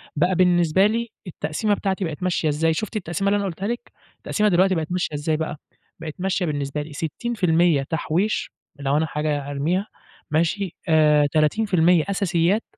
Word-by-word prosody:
بقى 175 +5 +2
بالنسبة 180 0 +4
لي 230 +1 -2 0.2
التقسيمة 175 +5 -1
بتاعتي 195 -2 -1
بقت 160 +2 -5
ماشية 170 -4 +1
إزاي؟ 160 +2 +1
شُفتِ 215 +7 -4
التقسيمة 185 +2 -1
اللي 205 - +2
أنا 200 - -1
قُلتها 190 +2 -4
لِك؟ 240 +1 -5 0.3
التقسيمة 210 -1 0
دلوقتي 185 +1 +3
بقت 160 +1 -3
ماشية 180 -4 -1
إزاي 155 +1 -1
بقى؟ 160 -1 -4 0.4
بقت 160 -2 -6
ماشية 190 -1 0
بالنسبة 145 -1 -2
لي 150 0 -9
60% 170 -3 +1
تحويش، 165 +7 -1 0.3
لو 140 +1 +1
أنا 160 - +2
حاجة 150 -2 -2
هارميها، 170 +9 -1 0.4
ماشي؟ 170 +4 0
آآ، 150 -2 +4
30% 170 +1 +3
أساسيات، 190 +1 +1
170 Hz, 160 wpm, -23 LUFS, 155-195 Hz, 0.4 s, بالنسبة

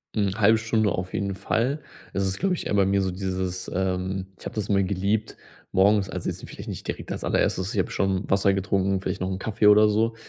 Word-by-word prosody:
Hm, 100 -2 +1
0,5 110 +1 +5
Stunde 110 -2 +1
auf 90 0 -3
jeden 100 -1 -2
Fall. 120 +8 0 0.3
Das 100 - 0
ist, 95 - -2
glaube 190 0 +1
ich, - - -5
eher - - -2
bei 100 -1 +4
mir 100 0 +2
so 95 -1 0
dieses, 95 0 -3
ähm, 95 0 -1
ich - - -15
habe - - -6
das 105 -2 -2
immer 100 -1 +3
geliebt, 100 +3 -1 0.3
morgens 100 +1 +3
also, - - -4
jetzt - - -6
vielleicht - - -9
nicht - - -6
direkt - - -4
als - - -6
allererstes, 95 +6 0
ich 105 - 0
habe 95 - 0
schon 95 0 0
Wasser 100 0 +3
getrunken, 95 0 +1
vielleicht 95 - -4
noch 95 - -1
‘n 95 - -3
Kaffee 105 0 +1
oder 105 +1 +7
so, 110 +2 +1
100 Hz, 235 wpm, -25 LUFS, 95-105 Hz, 0.3 s, oder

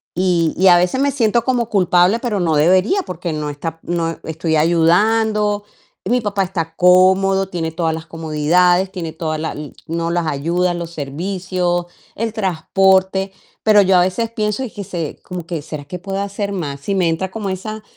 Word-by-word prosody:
y 175 -3 +1
y 190 +1 +4
a 175 -1 +8
veces 180 +9 +1
me 280 0 +2
siento 235 -2 +1
como 245 -3 0
culpable, 185 +1 +3
pero 230 -5 -2
no 165 -3 +1
debería, 185 - +3
porque 175 -1 -5
no 150 -1 -3
está 165 +2 -6
noe 165 -1 -2
estoy 160 0 -2
ayudando, 205 +6 +2 0.4
y - - -3
mi 250 -1 +2
papá 200 -2 0
está 165 -3 -4
cómodo, 190 +2 +4
tiene 165 -3 -3
todas 165 -1 -1
las 160 0 -6
comodidades, 165 +4 +2
tiene 170 -5 -5
toda 160 -1 -3
la 160 +1 -3
l 150 -2 -8
no, 165 +1 -2
las 170 -2 0
ayudas, 175 +5 0
los 170 -1 -5
servicios, 175 +4 -2 0.3
el 225 0 -2
transporte, 190 0 +1 0.3
pero 210 -2 +6
yo 190 -1 +4
a 180 - +5
veces 225 +6 -1
pienso, 215 +1 -2
y 245 - -6
que 200 - -7
se 170 -4 -5
como 180 -3 -7
que: 170 -3 -4
"¿Será 150 -1 -7
que 180 +4 -7
puedo 195 +1 -4
hacer 200 0 -3
más?". 145 -7 -4
Sí, 200 +6 -2
me 175 -3 +2
entra 180 +3 -2
como 210 -2 -4
esa 215 +3 -5
180 Hz, 190 wpm, -18 LUFS, 165-200 Hz, 0.4 s, a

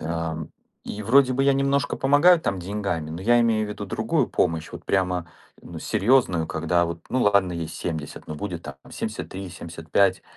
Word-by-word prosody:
Ам, 80 -1 -3 0.4
и 105 - -6
вроде 130 +4 +5
бы 135 +1 +1
я 140 - +5
немножко 140 -1 +1
помогаю 145 +6 +5
там 95 -9 -1
деньгами, 90 -5 -3
но 85 +3 -6
я 120 +4 +4
имею 110 -2 +2
в - - -6
виду - - -5
другую - - 0
помощь, 80 -2 0
вот - - -9
прямо, 90 -3 0 0.3
ну, 85 -2 -9
серьезную. 100 -5 +2
Когда 85 +2 +1
вот, 85 0 -5
ну, 130 - +1
ладно, 100 -3 +3
ей 85 -2 -4
70, 80 -4 -5
но 75 - -5
будет 85 0 -5
там 70 -2 -8
73, 95 -1 -5
75. 85 +4 0
95 Hz, 180 wpm, -24 LUFS, 85-115 Hz, 0.4 s, вроде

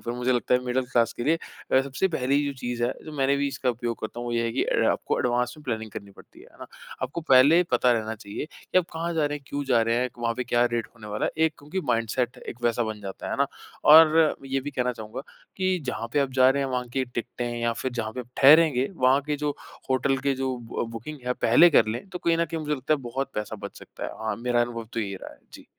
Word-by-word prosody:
पर 120 - -1
मुझे 125 +1 +1
लगता 125 0 +1
है 125 - +3
मिडिल 125 +1 0
क्लास 115 -1 +3
के 120 - -5
लिए 160 +3 +2 0.3
अ, 130 - +6
सबसे 140 +8 -1
पहली 140 -3 +1
जो 140 - -2
चीज़ 120 -1 -3
है 125 - 0
जो 155 - -8
मैंने 140 0 +2
भी 140 0 0
इसका 135 -2 -1
उपयोग 120 -1 -4
करता 110 +2 -5
हूँ 120 - -5
वो 120 - -3
ये 115 0 +1
है 115 - -1
कि - - 0 0.3
आपको - - -1
एडवांस 125 0 0
में 150 - -14
प्लानिंग 110 -3 -3
करनी 100 0 -9
पड़ती - - -17
है - - -15
है - - -22
ना? - - -9 0.4
आपको 135 +7 -3
पहले 140 +1 +6
ही 180 - +5
पता 125 0 +3
रहना 110 -1 -2
चाहिए 105 +2 -6
कि 185 - 0
आप 180 - +1
कहाँ 165 +1 -3
जा 155 -2 +1
रहे 145 0 -2
हैं 140 - -27
क्यों 145 0 -3
जा 125 -4 +3
रहे 115 +1 +1
हैं 125 +1 +1
वहाँ 115 -1 -1
पे 125 - -3
क्या 120 0 +2
रेट 115 -2 -1
होने 110 -3 -12
वाला 105 0 -2
है - - -1 0.2
एक 160 - -4
क्योंकि 150 +6 -4
माइंडसेट 120 +1 0
एक 120 - -8
वैसा 120 0 +2
बन 110 -1 -5
जाता 95 -1 -6
है - - -2
ना? - - +2 0.4
और 160 0 +7
ये 135 0 -1
भी 145 - -5
कहना 125 -2 -1
चाहूँगा 110 +2 -7 0.4
कि 185 -1 +1
जहाँ 115 -2 -3
पे - - +2
आप 140 -1 0
जा 130 0 +5
रहे 140 +1 0
हैं 135 - -2
वहाँ 125 -1 -2
की 130 0 0
टिकटे 120 0 -5
हैं 120 0 -3
या 115 0 +1
फिर 130 - -3
जहाँ 110 -2 -3
पे 125 - -5
ठहरेंगे 140 -2 +6
वहाँ 130 -2 +3
के 150 -1 -1
जो 150 0 -1 0.4
होटल 130 +1 +2
के 135 0 0
जो 130 -1 -2 0.2
ब - - -2
बुकिंग 115 +7 -7
है 125 - +2
पहले 165 +10 +7
कर 145 - +5
लें 115 - -4
तो 185 -2 -6
कहीं 170 -1 +1
ना 170 - +2
कहीं 165 0 -5
मुझे 150 -1 -1
लगता 135 +2 0
है 145 - -5
बहुत 135 +2 -4
पैसा 105 0 -4
बच - - -7
सकता - - -10
है। - - -3
हाँ 110 - -1
मेरा 120 0 0
अनुभव 120 -1 -2
तो 115 - -2
ये 100 -2 -3
रहा - - -8
है। - - -26
जी। - - -12
125 Hz, 275 wpm, -26 LUFS, 120-145 Hz, 0.4 s, और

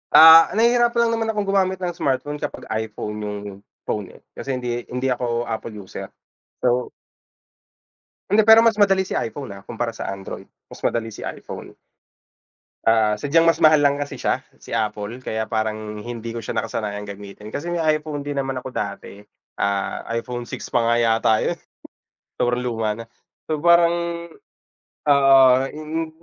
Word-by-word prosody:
Ah, 160 +1 +10
nahihirapan 240 +1 +3
lang 230 - +1
naman 225 - -1
akong 210 - 0
gumamit 190 -1 +2
ng 175 - 0
smartphone 145 -1 -2
kapag - - -5
iPhone 110 -1 -4
yung 105 -1 -4 0.4
phone 105 -3 -4
eh. - - -17
Kasi 135 -1 -4
hindi 120 -1 -4
hindi 125 +1 -1
ako 120 -1 -1
Apple 115 -1 -5
user. 95 - -8 0.5
So 125 0 +1 1.4
Hindi, 215 +1 +5
pero 220 +1 +8
mas 230 -1 +4
madali 195 -2 +3
si - - -4
iPhone, 115 -2 -4
ah, 100 - -13
kumpara 115 -1 -4
sa 95 - -4
Android. 95 0 -7 0.2
Mas - - -14
madali 115 -1 0
si - - -8
iPhone. - - -7 1.1
Ah, 110 -2 +3
sadyang 165 +6 +3
mas 165 - +4
mahal 155 -1 +5
lang 140 0 +3
kasi 145 0 -5
siya, - - -1 0.2
si - - -14
Apple 105 +1 -2
kaya 110 0 -3
parang 110 -1 -2
hindi 115 -1 -6
ko - - -3
siya - - -4
nakasanayang 105 -2 -4
gamitin. 100 +1 -9
Kasi 170 +9 -4
may 170 - -1 0.2
iPhone 150 -1 -6
din 145 0 -5
naman 135 -2 -2
ako - - -7
dati, 100 -4 -5 0.4
ah, 100 -1 -1
iPhone 120 +1 -4
6 - - -7
pa 120 - +2
nga 115 - +3
yata 115 -1 +3
yun - - -1 0.8
sobrang 120 0 +1
luma 115 -3 -1
na. 115 - -8 0.4
So, 155 -2 -2
parang, 170 0 +5 1.1
ah, 135 -2 +6
mm, 155 +2 -4
125 Hz, 160 wpm, -22 LUFS, 110-155 Hz, 1.4 s, Ah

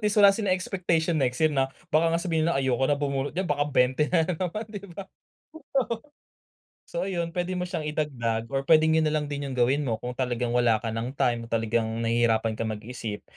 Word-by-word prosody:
least 210 -1 0
wala 200 -1 +8
ring 205 -1 -2
expectation 175 -4 0
next 125 -1 +1
year 155 +1 +2
na 135 -1 +1 0.2
baka 160 +2 +4
nga 165 - +2
sabihin 165 -2 0
nila, 170 - +1
"Ayoko 130 -1 +1
na 145 - +3
bumunot 140 +1 -2
diyan, 190 - 0
baka 145 -5 0
20 130 +2 +2
na 165 -3 +3
naman," 180 +5 -3
'di 200 -1 -7
ba? 190 +3 -8 0.8
Oo 235 0 -3 0.8
So 175 +2 -3
ayun, 170 -3 -2
puwede 180 +1 -2
mo 180 - -2
siyang 175 -4 -4
idagdag 120 -7 -2
or 135 0 -1
puwedeng 160 0 +5
'yun 155 - +2
na 155 - 0
lang 150 -1 -1
din 140 -1 -3
'yung 130 - -5
gawin 135 +4 +2
mo 115 -3 0
kung 125 0 -3
talagang 125 -2 -1
wala 120 -2 +3
ka 115 - -2
nang 115 +4 -4
time 120 -4 0
o - - -16
talagang 115 0 0
nahihirapan 115 -1 +1
kang 115 - -1
mag-isip. 110 -1 -6
145 Hz, 215 wpm, -26 LUFS, 120-170 Hz, 0.8 s, wala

